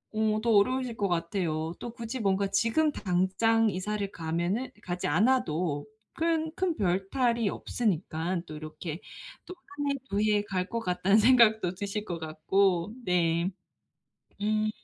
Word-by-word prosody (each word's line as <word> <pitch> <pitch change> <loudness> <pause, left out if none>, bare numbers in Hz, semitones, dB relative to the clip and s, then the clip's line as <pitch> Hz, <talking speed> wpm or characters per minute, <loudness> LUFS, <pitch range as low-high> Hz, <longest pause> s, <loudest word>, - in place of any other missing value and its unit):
어 215 0 +2
더 235 +1 +1
어려우실 245 +3 +2
것 200 -2 0
같아요. 165 -2 -1
또 240 - -6
굳이 235 +1 -5
뭔가 195 0 +1
지금 230 +11 +2
당장 215 +5 +2
이사를 200 +1 -2
가면은 175 +9 -2
가지 180 -2 -4
않아도 170 - +1 0.3
큰 320 -1 0
큰 370 -3 0
별 190 0 0
탈이 235 -5 +1
없으니깐 175 -5 -2
또 155 - -7
'이렇게 155 +2 -7 0.4
또 - - -8 0.3
1 285 -1 +1
해, 280 - 0
2 200 - 0
해 210 -1 +2
갈 190 -3 -2
것 230 - -2
같다.'는 190 0 +2
생각도 220 -5 +5
드실 205 +2 -4
것 175 -4 -4
같고 170 +5 +1
네. 170 0 +2 0.9
음. 215 +1 +1
200 Hz, 245 characters per minute, -29 LUFS, 175-225 Hz, 0.9 s, 생각도